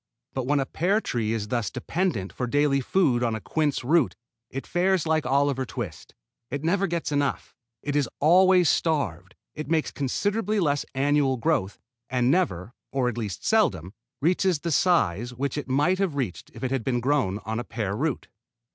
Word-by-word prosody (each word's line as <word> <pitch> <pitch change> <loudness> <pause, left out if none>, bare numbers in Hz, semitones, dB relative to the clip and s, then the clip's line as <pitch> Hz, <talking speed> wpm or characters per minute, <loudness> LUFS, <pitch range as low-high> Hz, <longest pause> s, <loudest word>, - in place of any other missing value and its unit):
But 130 -2 -3
when 145 +1 +2
a 135 - 0
pear 190 +9 +1
tree 115 - -2
is 105 -2 -2
thus 120 -5 -1
dependent 130 - -2
for 125 - -3
daily 145 +1 +2
food 130 -5 +2
on 115 -2 0
a - - -3
quince 150 +4 -1
root 150 +1 +2 0.3
it 135 - -6
fares 180 -1 +1
like 160 -1 +1
Oliver 140 -1 +2
Twist. 105 - -7 0.3
It 140 +2 -4
never 195 +4 +2
gets 170 -3 -2
enough. 145 -1 -1 0.3
It 145 0 -2
is 140 -5 +1
always 180 +3 +5
starved. 105 - 0 0.2
It 155 0 -6
makes 160 -1 +1
considerably 205 - -1
less 145 -5 0
annual 140 -1 +2
growth, 115 -8 0 0.3
and 125 0 +2
never 120 - 0 0.2
(or 130 -2 +1
at 120 - -6
least 105 -4 -5
seldom) 95 - +2 0.3
reaches 175 0 +2
the 170 - -2
size 125 - +2
which 135 +2 -2
it 145 -2 -5
might 150 +8 +2
have 190 -7 0
reached 125 -11 -3
if - - -9
it 130 - -1
had 135 -4 -1
been 125 -1 0
growing 125 -7 +1
on 110 +2 -2
a - - -3
pear 105 -5 -3
root. 145 +3 -2
140 Hz, 180 wpm, -26 LUFS, 120-165 Hz, 0.3 s, always